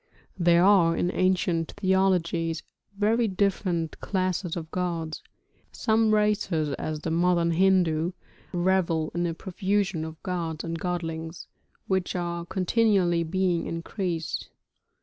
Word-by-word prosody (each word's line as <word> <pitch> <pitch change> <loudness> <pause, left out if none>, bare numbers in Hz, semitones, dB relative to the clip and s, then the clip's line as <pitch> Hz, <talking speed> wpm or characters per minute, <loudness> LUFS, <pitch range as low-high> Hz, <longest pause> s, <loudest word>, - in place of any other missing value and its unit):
There 170 0 +5
are 180 -4 +5
in 175 - +1
ancient 180 -3 +1
theologies 180 -4 +1 0.3
very 225 +3 +2
different 185 -4 -1
classes 185 -2 -1
of 160 -2 -6
gods. 170 -3 -3 0.5
Some 220 -1 +2
races, 210 -7 +1
as 155 -1 -3
the 160 - -3
modern 170 0 +2
Hindu, 175 -2 +2 0.4
revel 175 -3 +1
in 175 +1 0
a 165 - -3
profusion 190 -1 -1
of 160 0 -7
gods 165 -4 -3
and 165 -1 -4
godlings, 165 -2 -4 0.4
which 190 -1 -1
are 170 -1 -3
continually 190 -3 +2
being 175 +1 0
increased. 165 -1 -3
175 Hz, 115 wpm, -26 LUFS, 165-190 Hz, 0.5 s, There